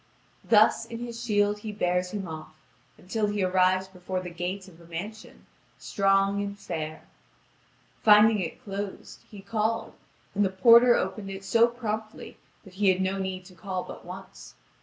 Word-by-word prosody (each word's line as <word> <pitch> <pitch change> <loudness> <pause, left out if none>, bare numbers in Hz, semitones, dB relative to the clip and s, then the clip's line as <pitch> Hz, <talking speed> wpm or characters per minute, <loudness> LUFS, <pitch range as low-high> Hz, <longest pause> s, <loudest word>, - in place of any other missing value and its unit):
Thus, 215 -1 +4
in 230 - -7
his 235 0 -6
shield 205 -2 +1
he 215 0 -6
bears 180 -3 0
him 195 -1 -5
off, 155 -1 -8 0.4
until 210 +4 -2
he 205 -1 -1
arrives 185 0 +2
before 185 0 -5
the 180 -1 -7
gate 180 +3 -4
of 170 -2 -16
a - - -15
mansion, 200 +6 -8 0.3
strong 195 0 +1
and 200 0 -5
fair. 155 -5 -5 1.0
Finding 210 0 +6
it 175 +6 -5
closed, 200 -2 -6
he 205 -2 -11
called, 220 +2 -2 0.4
and 205 - +2
the 195 - +2
porter 235 +5 +7
opened 195 +2 -2
it 195 0 -7
so 230 +4 +4
promptly 220 -2 -5 0.3
that 190 -4 -15
he 195 +1 +2
had 185 0 +2
no 190 +1 -1
need 190 -1 -4
to 185 - -14
call 185 +1 -4
but - - -10
once. 185 +2 -11
195 Hz, 165 wpm, -27 LUFS, 185-215 Hz, 1.0 s, porter